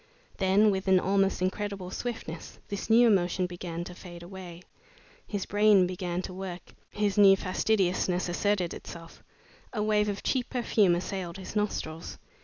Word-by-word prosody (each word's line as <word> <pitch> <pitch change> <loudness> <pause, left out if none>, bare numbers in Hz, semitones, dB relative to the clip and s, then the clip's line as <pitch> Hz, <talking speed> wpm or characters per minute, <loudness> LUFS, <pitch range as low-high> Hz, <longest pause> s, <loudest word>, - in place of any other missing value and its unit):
Then, 200 +2 +4
with 190 0 -3
an 190 -1 +5
almost 195 0 +1
incredible 195 -1 -3
swiftness, 205 -8 -6
this 200 +2 -5
new 235 +2 +7
emotion 185 -3 +2
began 175 -1 -5
to 180 - -8
fade 175 -1 -11
away. 180 -1 -10 0.6
His 200 -3 -3
brain 205 -2 +4
began 180 0 -3
to 185 - -6
work, 185 -1 -7 0.2
his 205 0 0
new 195 -1 +8
fastidiousness 185 -2 0
asserted 180 0 0
itself. 165 -1 -10 0.5
A 210 - -1
wave 210 -1 +2
of 200 0 -4
cheap 255 -3 0
perfume 215 -7 +2
assailed 185 0 -4
his 190 +2 -8
nostrils. 170 -6 -3
190 Hz, 150 wpm, -28 LUFS, 180-205 Hz, 0.6 s, new